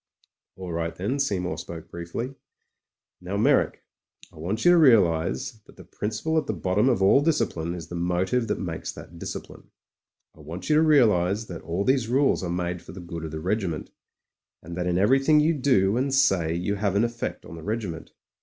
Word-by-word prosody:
'AH 90 -2 -6
right 85 0 -3
then," 110 +10 -2
Seymour 95 -9 -1
spoke 85 -2 -9
briefly. 85 +10 -5 0.9
'''Now, 90 +3 -4
Meyrick, 105 - +2 0.5
I - - -17
want 95 +8 -3
you 175 - +8
to 175 - +6
realise 85 - +3 0.2
that - - -17
the - - -12
principle 110 +10 -2
at 150 - -6
the 110 - -1
bottom 95 - +2
of 115 -7 +1
all 100 +8 +6
discipline 90 - 0
is 85 -3 -8
the - - -8
motive 90 +7 0
that - - -1
makes 80 -5 -4
that 85 +1 -12
discipline. - - -8 0.7
I - - -20
want 85 - -6
you - - +5
to - - +5
realise 110 - +3
that 85 -5 -8
all 85 +4 -2
these 130 -3 +2
rules 135 +3 +2
are 90 - -3
made 90 0 -2
for 85 - -12
the 95 - -9
good 85 -2 -6
of - - -5
the 80 +1 -5
regiment, 90 -2 -2 0.7
and 85 +2 -8
that 90 0 -2
in 90 0 +1
everything 135 +9 +4
you 155 +2 +3
do 120 -8 +2
and 135 +2 0
say 95 -12 +3
you 90 +4 -1
have 100 -1 0
an 105 - +3
effect 120 0 -4
on 80 - -9
the 80 - -9
regiment. 100 -4 -4
95 Hz, 200 wpm, -25 LUFS, 85-125 Hz, 0.9 s, you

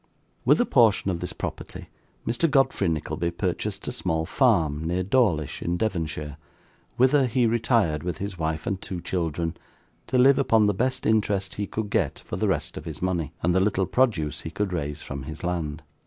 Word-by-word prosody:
With - - +5
a 245 - +4
portion 110 - +4
of 85 - -3
this - - -4
property - - -7 0.4
Mr. 120 +8 +1
Godfrey 135 -7 +2
Nickleby 85 +1 -1
purchased 85 - -3
a - - -1
small 80 0 -1
farm, 75 -2 +2
near 90 +3 -1
Dawlish 95 - +1
in 85 +1 -1
Devonshire, 80 -8 -2 0.6
whither 130 +1 +4
he 120 +1 +2
retired 115 - +2
with 85 -1 -3
his 100 -1 -4
wife 80 -2 -2
and 95 -1 -2
two 90 - -5
children, 85 -2 -2 0.5
to 130 - +1
live 135 +2 +6
upon 115 -5 +4
the 105 - +3
best 125 +6 -1
interest 105 -3 +1
he 105 -1 -3
could 110 -2 -4
get - - +1
for - - -7
the - - 0
rest - - -1
of 75 - -7
his 80 -3 -6
money, 90 -5 -1
and 90 +2 +3
the 95 - +4
little 95 -1 +2
produce 95 - +1
he - - -6
could 95 +2 -2
raise 75 -3 -3
from 70 0 -6
his 75 +3 -8
land. 80 -3 -3
90 Hz, 190 wpm, -25 LUFS, 80-110 Hz, 0.6 s, live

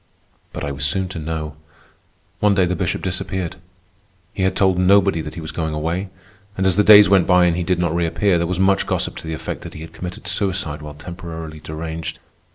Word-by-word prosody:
But - - -6
I 70 - -2
was 70 0 -5
soon 90 +6 0
to 85 - -6
know. 75 -1 -4 0.8
One 105 -1 +3
day 95 -2 +4
the 90 +1 -1
Bishop 90 +1 -2
disappeared. 90 -1 -3 0.8
He - - -4
had 95 0 +1
told 95 -2 +3
nobody 95 -2 +4
that - - -7
he 85 - -6
was 80 - -6
going 80 -2 -3
away; 85 +5 -2 0.5
and 95 - 0
as 95 -2 +3
the 105 - +4
days 105 0 +9
went 95 -2 +4
by 90 -1 +5
and 85 -1 +2
he 90 - -1
did 90 +1 +1
not 85 -2 0
reappear, 85 +2 +1
there 85 - 0
was 90 0 -2
much 95 0 +3
gossip - - -1
to - - -8
the 80 - -3
effect - - -5
that - - -9
he 75 - -8
had 80 - -10
committed 90 0 -7
suicide 90 -7 -1
while 75 -1 -8
temporarily 80 -1 -8
deranged. 80 +1 -6
90 Hz, 220 wpm, -20 LUFS, 80-95 Hz, 0.8 s, days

